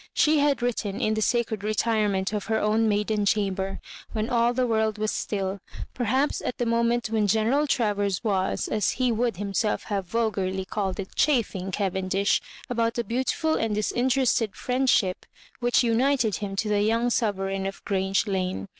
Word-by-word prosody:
She 305 Hz, 0 st, +4 dB
had 285 Hz, -3 st, +2 dB
written 215 Hz, -5 st, -2 dB
in 215 Hz, -, +1 dB
the 215 Hz, -, -1 dB
sacred 225 Hz, -2 st, 0 dB
retirement 210 Hz, -2 st, 0 dB
of 210 Hz, -2 st, -2 dB
her 220 Hz, 0 st, 0 dB
own 220 Hz, +1 st, +2 dB
maiden 210 Hz, 0 st, 0 dB
chamber, 195 Hz, -2 st, 0 dB, 0.3 s
when 220 Hz, +3 st, -2 dB
all 235 Hz, 0 st, +3 dB
the 250 Hz, +1 st, +1 dB
world 220 Hz, -2 st, +1 dB
was 215 Hz, 0 st, -1 dB
still; 195 Hz, -1 st, -2 dB, 0.3 s
perhaps 260 Hz, +4 st, 0 dB
at -, -, -4 dB
the 240 Hz, -, -1 dB
moment 235 Hz, 0 st, +1 dB
when 215 Hz, -2 st, +2 dB
Gteneral 225 Hz, +8 st, +2 dB
Travers 205 Hz, -6 st, 0 dB
was, 195 Hz, -4 st, 0 dB
as 215 Hz, -3 st, 0 dB
he 255 Hz, -1 st, +1 dB
would 230 Hz, -3 st, 0 dB
himself 205 Hz, +1 st, -1 dB
have 195 Hz, -3 st, -2 dB
vulgarly 190 Hz, -3 st, -1 dB
called 190 Hz, -2 st, -3 dB
it, 190 Hz, -, -6 dB
"chaffing" 220 Hz, -10 st, +1 dB
Cavendish 190 Hz, 0 st, 0 dB, 0.3 s
about 230 Hz, -1 st, 0 dB
the 235 Hz, -, -1 dB
beautiful 260 Hz, +7 st, 0 dB
and 225 Hz, -6 st, 0 dB
disinterested 240 Hz, 0 st, +1 dB
friendship 250 Hz, -7 st, +1 dB, 0.4 s
which 245 Hz, +1 st, +3 dB
united 240 Hz, -1 st, +2 dB
him 200 Hz, -2 st, -5 dB
to 215 Hz, +2 st, -1 dB
the 205 Hz, -1 st, +2 dB
young 230 Hz, +3 st, +1 dB
sovereign 195 Hz, -4 st, -1 dB
of 195 Hz, -, -8 dB
Grange 195 Hz, 0 st, +1 dB
Lane. 190 Hz, -1 st, -2 dB
215 Hz, 165 wpm, -26 LUFS, 195-235 Hz, 0.4 s, She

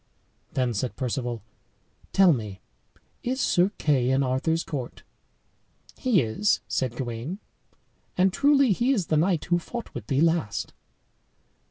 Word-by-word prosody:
Then 125 Hz, -2 st, 0 dB
said 115 Hz, +4 st, -2 dB
Perceval, 120 Hz, -3 st, -3 dB, 0.7 s
"Tell 190 Hz, -3 st, +6 dB
me, 105 Hz, -7 st, -5 dB, 0.6 s
is 255 Hz, +2 st, -2 dB
Sir 180 Hz, -6 st, +3 dB
Kay 130 Hz, -5 st, +2 dB
in 135 Hz, +1 st, +3 dB
Arthur's 140 Hz, +6 st, 0 dB
court?" 130 Hz, -5 st, -6 dB, 0.9 s
"He 240 Hz, -, +2 dB
is," 115 Hz, -, +1 dB
said 125 Hz, -3 st, -1 dB
Gawain; 120 Hz, +7 st, -4 dB, 0.8 s
"and 185 Hz, 0 st, +3 dB
truly 280 Hz, -2 st, +4 dB
he 240 Hz, +7 st, +2 dB
is 200 Hz, -9 st, 0 dB
the -, -, +5 dB
knight 170 Hz, 0 st, +1 dB
who 175 Hz, 0 st, +2 dB
fought 235 Hz, +7 st, -7 dB
with 110 Hz, -4 st, -7 dB
thee 135 Hz, -, +1 dB
last." 165 Hz, -9 st, 0 dB
150 Hz, 135 wpm, -26 LUFS, 125-190 Hz, 0.9 s, Tell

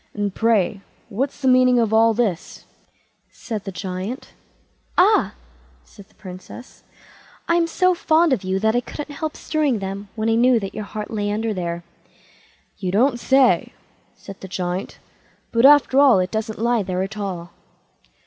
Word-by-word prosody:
"And, 205 Hz, -2 st, -2 dB
pray, 215 Hz, -3 st, +1 dB, 0.3 s
what's 265 Hz, +8 st, -3 dB
the 265 Hz, -, 0 dB
meaning 255 Hz, -1 st, +5 dB
of 225 Hz, -2 st, +1 dB
all 225 Hz, 0 st, +4 dB
this?" 205 Hz, -8 st, -2 dB, 0.6 s
said 215 Hz, -4 st, -7 dB
the 195 Hz, -, -5 dB
Giant. 190 Hz, +6 st, -6 dB, 0.6 s
"Ah!" 410 Hz, +4 st, +3 dB, 0.5 s
said 200 Hz, -2 st, -17 dB
the -, -, -30 dB
Princess, 185 Hz, +6 st, -12 dB, 0.6 s
"I'm 335 Hz, 0 st, +2 dB
so 365 Hz, +2 st, +2 dB
fond 325 Hz, -2 st, +2 dB
of 225 Hz, -, -2 dB
you 185 Hz, +1 st, -1 dB
that 220 Hz, +1 st, +2 dB
I 245 Hz, -, +2 dB
couldn't 295 Hz, +3 st, -8 dB
help 310 Hz, +1 st, -5 dB
strewing 300 Hz, -6 st, 0 dB
them, 195 Hz, 0 st, -6 dB
when 220 Hz, 0 st, -2 dB
I 225 Hz, -, +2 dB
knew 240 Hz, +1 st, +4 dB
that 195 Hz, -2 st, -6 dB
your 215 Hz, -, -5 dB
heart 210 Hz, +1 st, -7 dB
lay 205 Hz, -2 st, -2 dB
under 220 Hz, +1 st, -2 dB
there." 175 Hz, -2 st, -4 dB, 1.0 s
"You 185 Hz, -3 st, -2 dB
don't 240 Hz, +5 st, +2 dB
say 265 Hz, 0 st, +3 dB, 0.4 s
so", -, -, -29 dB
said 195 Hz, -1 st, -10 dB
the 190 Hz, -, -8 dB
Giant; 185 Hz, +1 st, -4 dB, 0.5 s
"but 230 Hz, +3 st, +5 dB
after 285 Hz, -2 st, +5 dB
all 280 Hz, -7 st, +6 dB
it 185 Hz, 0 st, -1 dB
doesn't 220 Hz, 0 st, -3 dB
lie 235 Hz, +1 st, +1 dB
there 185 Hz, -1 st, -2 dB
at 210 Hz, +2 st, -6 dB
all." 180 Hz, -4 st, -5 dB
220 Hz, 170 wpm, -21 LUFS, 195-255 Hz, 1.0 s, all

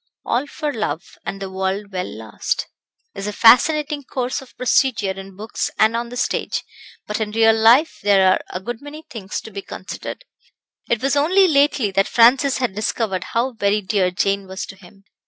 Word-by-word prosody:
"All 250 Hz, +5 st, 0 dB
for 300 Hz, 0 st, -4 dB
love, 185 Hz, -7 st, -4 dB
and 195 Hz, -, -4 dB
the 195 Hz, -1 st, -6 dB
world 190 Hz, +2 st, -3 dB
well 185 Hz, -1 st, -3 dB
lost," -, -, -3 dB, 0.5 s
is 195 Hz, -, -5 dB
a -, -, -2 dB
fascinating 285 Hz, +7 st, +4 dB
course 255 Hz, +1 st, -3 dB
of 265 Hz, -, -17 dB
procedure 240 Hz, -5 st, +2 dB
in 195 Hz, 0 st, -9 dB
books 215 Hz, +3 st, -3 dB
and 220 Hz, +1 st, +4 dB
on 235 Hz, 0 st, -2 dB
the 245 Hz, -, -7 dB
stage, 250 Hz, -, -1 dB, 0.4 s
but 210 Hz, -, -3 dB
in 215 Hz, -1 st, -1 dB
real 225 Hz, +1 st, +4 dB
life 235 Hz, +8 st, +4 dB
there 195 Hz, -2 st, +4 dB
are -, -, +1 dB
a 180 Hz, -, -4 dB
good 235 Hz, +4 st, -6 dB
many 295 Hz, +2 st, -10 dB
things 205 Hz, -4 st, -5 dB
to 220 Hz, -, -11 dB
be 200 Hz, 0 st, -6 dB
considered. 195 Hz, -, -8 dB, 0.6 s
It 235 Hz, +1 st, 0 dB
was 275 Hz, +1 st, +2 dB
only 365 Hz, +7 st, +4 dB
lately 280 Hz, -, +2 dB
that 195 Hz, +1 st, +2 dB
Francis 255 Hz, +4 st, +4 dB
had 250 Hz, -7 st, -1 dB
discovered 210 Hz, -2 st, -2 dB
how 240 Hz, +3 st, -1 dB
very 210 Hz, -1 st, +1 dB
dear 190 Hz, -2 st, +1 dB
Jane 195 Hz, +2 st, -1 dB
was 190 Hz, 0 st, -5 dB
to 200 Hz, -, -11 dB
him. 195 Hz, +1 st, -18 dB
220 Hz, 190 wpm, -20 LUFS, 195-260 Hz, 0.6 s, fascinating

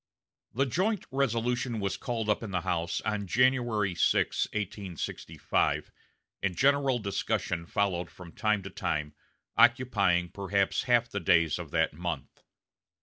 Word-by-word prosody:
The 135 Hz, +3 st, +2 dB
joint 190 Hz, -, 0 dB
resolution 125 Hz, -2 st, 0 dB
was 100 Hz, -2 st, -1 dB
called 115 Hz, -3 st, -3 dB
up 105 Hz, -, +1 dB
in 115 Hz, -, -5 dB
the 90 Hz, -2 st, -1 dB
House 85 Hz, -2 st, -1 dB
on 105 Hz, -2 st, -2 dB
January 120 Hz, -4 st, +2 dB
6, -, -, +2 dB
1865, 100 Hz, -4 st, -2 dB, 0.5 s
and 95 Hz, -2 st, -1 dB
general 140 Hz, -1 st, +3 dB
discussion 95 Hz, -5 st, -2 dB
followed 90 Hz, -4 st, 0 dB
from 90 Hz, -2 st, -12 dB
time 105 Hz, -1 st, 0 dB
to 100 Hz, -, -7 dB
time, 75 Hz, -4 st, -2 dB, 0.4 s
occupying 100 Hz, -8 st, +4 dB
perhaps 100 Hz, 0 st, 0 dB
half 120 Hz, -2 st, +3 dB
the 100 Hz, -, -4 dB
days 85 Hz, -3 st, +3 dB
of -, -, -7 dB
that -, -, +1 dB
month. 85 Hz, -3 st, -5 dB
100 Hz, 135 wpm, -29 LUFS, 90-120 Hz, 0.5 s, occupying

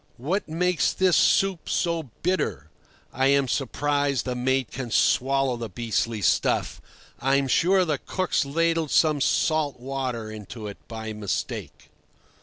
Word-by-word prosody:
"What 160 Hz, -, -2 dB
makes 180 Hz, +2 st, +1 dB
this 185 Hz, -2 st, +3 dB
soup 195 Hz, -3 st, +2 dB
so 165 Hz, -5 st, -1 dB
bitter? 120 Hz, -, -1 dB, 0.4 s
I 130 Hz, +2 st, +2 dB
am 140 Hz, -1 st, +3 dB
surprised 140 Hz, 0 st, 0 dB
the 125 Hz, -, -2 dB
mate 130 Hz, 0 st, 0 dB
can 125 Hz, -2 st, -5 dB
swallow 135 Hz, +2 st, +2 dB
the 115 Hz, -1 st, -5 dB
beastly 115 Hz, +1 st, -2 dB
stuff. -, -, +1 dB, 0.4 s
I'm 135 Hz, +1 st, +2 dB
sure 185 Hz, +7 st, +3 dB
the 150 Hz, -4 st, -1 dB
cook's 185 Hz, -1 st, -1 dB
ladled 165 Hz, +2 st, 0 dB
some 155 Hz, -2 st, +3 dB
salt 150 Hz, -2 st, +1 dB
water 125 Hz, -4 st, -4 dB
into 110 Hz, +1 st, -8 dB
it 100 Hz, -1 st, -7 dB
by 110 Hz, -1 st, -6 dB
mistake." 105 Hz, -2 st, -5 dB
135 Hz, 135 wpm, -25 LUFS, 120-160 Hz, 0.4 s, this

